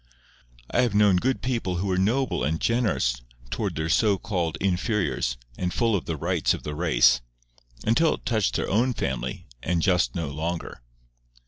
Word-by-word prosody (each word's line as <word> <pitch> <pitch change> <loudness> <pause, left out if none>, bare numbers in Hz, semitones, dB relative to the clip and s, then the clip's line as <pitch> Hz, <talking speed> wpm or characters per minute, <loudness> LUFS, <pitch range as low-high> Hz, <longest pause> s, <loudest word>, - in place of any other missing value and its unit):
I 125 - +3
have 120 -5 +1
known 105 -3 +5
good 130 +8 0
people 115 -8 -1
who 90 +3 -2
were 95 -2 0
noble 115 - +1
and 80 +4 0
generous 110 - +1 0.3
towards - - -2
their 80 +2 -2
so 100 +4 +3
called 90 -7 -2
inferiors 95 - 0 0.2
and 90 -1 -1
full 115 0 +1
of 90 - -2
the 80 - -3
rights 85 +2 +1
of - - -10
the 75 - -4
race—until - - +1
it - - -18
touched 110 -4 +1
their - - -1
own 120 +5 +1
family, 65 -2 -3 0.2
and 85 -1 0
just 90 -11 +2
no 80 -4 -2
longer. 80 -1 -4
90 Hz, 165 wpm, -25 LUFS, 75-110 Hz, 0.3 s, known